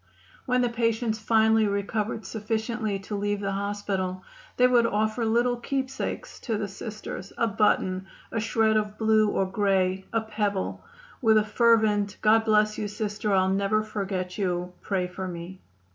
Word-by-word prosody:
When 250 Hz, 0 st, +2 dB
the 245 Hz, -, +2 dB
patients 230 Hz, -1 st, 0 dB
finally 220 Hz, 0 st, +3 dB
recovered 205 Hz, +2 st, -2 dB
sufficiently 220 Hz, 0 st, -2 dB
to 205 Hz, +2 st, -5 dB
leave 205 Hz, 0 st, -1 dB
the 200 Hz, -1 st, -2 dB
hospital 195 Hz, -2 st, -2 dB, 0.3 s
they 250 Hz, -, +5 dB
would 245 Hz, -2 st, +4 dB
offer 215 Hz, +2 st, 0 dB
little 240 Hz, +2 st, +2 dB
keepsakes 265 Hz, +2 st, -4 dB
to 225 Hz, -4 st, -2 dB
the 205 Hz, -1 st, -2 dB
Sisters 205 Hz, -1 st, -7 dB
a 230 Hz, -, +2 dB
button, 195 Hz, -3 st, +1 dB, 0.2 s
a 225 Hz, -, -1 dB
shred 220 Hz, 0 st, +2 dB
of 210 Hz, -1 st, -2 dB
blue 220 Hz, -1 st, +3 dB
or 195 Hz, -, +1 dB
gray, 190 Hz, -1 st, +1 dB
a 225 Hz, -, +1 dB
pebble 210 Hz, -3 st, -2 dB, 0.4 s
with 220 Hz, -3 st, +5 dB
a 215 Hz, -, +4 dB
fervent 215 Hz, -2 st, +3 dB
"God 220 Hz, +1 st, +5 dB
bless 215 Hz, -1 st, +3 dB
you, 210 Hz, -, -2 dB
Sister. 210 Hz, 0 st, -3 dB
I'll 190 Hz, -1 st, +3 dB
never 200 Hz, +2 st, +1 dB
forget 195 Hz, -3 st, -4 dB
you. 180 Hz, -2 st, -1 dB
Pray 190 Hz, -3 st, -1 dB
for 185 Hz, +1 st, -5 dB
me." 175 Hz, +1 st, -8 dB
210 Hz, 160 wpm, -26 LUFS, 195-220 Hz, 0.4 s, they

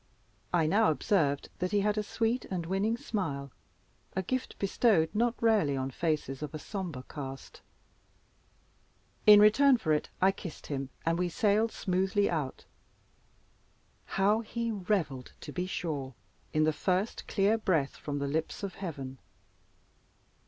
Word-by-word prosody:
I 170 Hz, -3 st, +3 dB
now 210 Hz, +7 st, +4 dB
observed 150 Hz, -3 st, +1 dB
that 180 Hz, -, 0 dB
he 205 Hz, -1 st, +3 dB
had 210 Hz, +1 st, +1 dB
a 215 Hz, -, +1 dB
sweet 225 Hz, +3 st, -1 dB
and 180 Hz, -3 st, -3 dB
winning 195 Hz, +6 st, 0 dB
smile 160 Hz, -, -3 dB, 0.6 s
a 190 Hz, -, 0 dB
gift 255 Hz, +7 st, -3 dB
bestowed 195 Hz, -4 st, +2 dB
not 235 Hz, +2 st, +2 dB
rarely 210 Hz, -12 st, +3 dB
on 130 Hz, 0 st, -2 dB
faces 150 Hz, -3 st, -2 dB
of 150 Hz, 0 st, -5 dB
a -, -, -2 dB
sombre 170 Hz, -5 st, -5 dB
cast. 135 Hz, -2 st, -8 dB, 1.7 s
In 210 Hz, -1 st, +10 dB
return 250 Hz, +6 st, +6 dB
for 160 Hz, -9 st, +1 dB
it 150 Hz, -, -1 dB
I 190 Hz, +1 st, +5 dB
kissed 180 Hz, -4 st, -9 dB
him, 135 Hz, -2 st, -4 dB, 0.2 s
and 165 Hz, +1 st, +1 dB
we 180 Hz, -1 st, +1 dB
sailed 215 Hz, +4 st, +2 dB
smoothly 190 Hz, +2 st, +1 dB
out. 150 Hz, -6 st, -3 dB, 1.5 s
How 205 Hz, +3 st, +4 dB
he 230 Hz, +1 st, -3 dB
revelled, 180 Hz, -, -2 dB
to -, -, -7 dB
be 180 Hz, 0 st, -3 dB
sure, 145 Hz, -8 st, -4 dB, 0.4 s
in 155 Hz, -, +2 dB
the 155 Hz, 0 st, +3 dB
first 185 Hz, +7 st, -1 dB
clear 205 Hz, +2 st, +3 dB
breath 165 Hz, -10 st, +1 dB
from 145 Hz, -1 st, -4 dB
the 140 Hz, 0 st, -2 dB
lips 160 Hz, +7 st, -2 dB
of 195 Hz, -2 st, -3 dB
heaven! 135 Hz, -8 st, -5 dB
180 Hz, 145 wpm, -30 LUFS, 150-210 Hz, 1.7 s, In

